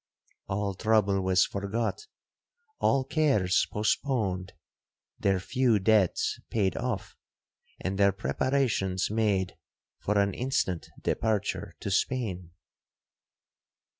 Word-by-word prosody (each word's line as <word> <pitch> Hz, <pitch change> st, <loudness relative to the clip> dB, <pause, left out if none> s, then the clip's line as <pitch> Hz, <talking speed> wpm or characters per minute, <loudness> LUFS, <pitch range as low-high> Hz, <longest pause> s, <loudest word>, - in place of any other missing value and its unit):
All 100 Hz, 0 st, -1 dB
trouble 100 Hz, -1 st, +2 dB
was 95 Hz, 0 st, +3 dB
forgot,—all 135 Hz, -, -3 dB
cares 135 Hz, -, +2 dB
postponed,—their 100 Hz, -4 st, -2 dB
few 120 Hz, +3 st, +2 dB
debts 100 Hz, -2 st, +2 dB
paid 100 Hz, -4 st, +1 dB
off,—and 100 Hz, -4 st, -6 dB
their 100 Hz, 0 st, +5 dB
preparations 100 Hz, -4 st, 0 dB
made 105 Hz, -4 st, 0 dB, 0.4 s
for 105 Hz, +1 st, 0 dB
an 100 Hz, -1 st, +2 dB
instant 120 Hz, -9 st, -1 dB
departure 110 Hz, -2 st, -1 dB
to 100 Hz, -, -3 dB
Spain. 95 Hz, -5 st, -1 dB
105 Hz, 80 wpm, -28 LUFS, 95-125 Hz, 0.4 s, their